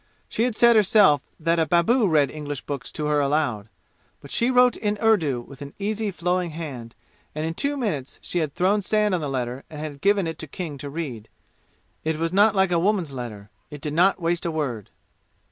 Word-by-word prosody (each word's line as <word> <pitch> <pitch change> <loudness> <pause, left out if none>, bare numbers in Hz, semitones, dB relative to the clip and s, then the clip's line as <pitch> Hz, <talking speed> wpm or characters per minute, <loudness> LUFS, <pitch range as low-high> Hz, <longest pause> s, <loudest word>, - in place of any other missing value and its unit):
She 225 - 0
had 245 -3 -1
said 235 +1 +6
herself 200 - +5 0.2
that 165 +1 +1
a 160 - +2
babu 205 +7 +3
read 150 -5 +3
English 145 -3 -5
books 140 -2 -6
to 150 - -3
her 150 0 +2
aloud. 140 -7 0 0.5
But 140 - -13
she 235 - +1
wrote 250 -1 +5
in 210 -1 -1
Urdu 165 - +2
with 135 +3 -14
an 140 0 -9
easy 215 +1 -2
flowing 180 -1 -1
hand, 140 -8 -7 0.4
and 155 +1 -2
in 165 - -2
two 285 +10 -2
minutes 170 - -3
she 175 - -3
had 155 -4 -2
thrown 200 +3 +2
sand 210 +1 +1
on 180 - 0
the 145 - -3
letter 125 0 -3
and 155 - -9
had 150 -2 -6
given 200 -1 +3
it 165 0 -5
to 160 - -6
King 150 -2 -6
to 145 - -6
read. 135 -8 -6 0.7
It 160 0 -1
was 165 +2 -2
not 205 +2 +5
like 190 -1 +3
a 170 - +3
woman's 185 -4 +1
letter. 110 -6 -7 0.2
It 150 - -9
did 150 0 -4
not 180 +5 +3
waste 170 0 -1
a 170 - -1
word. 135 - -3
165 Hz, 215 wpm, -24 LUFS, 145-200 Hz, 0.7 s, said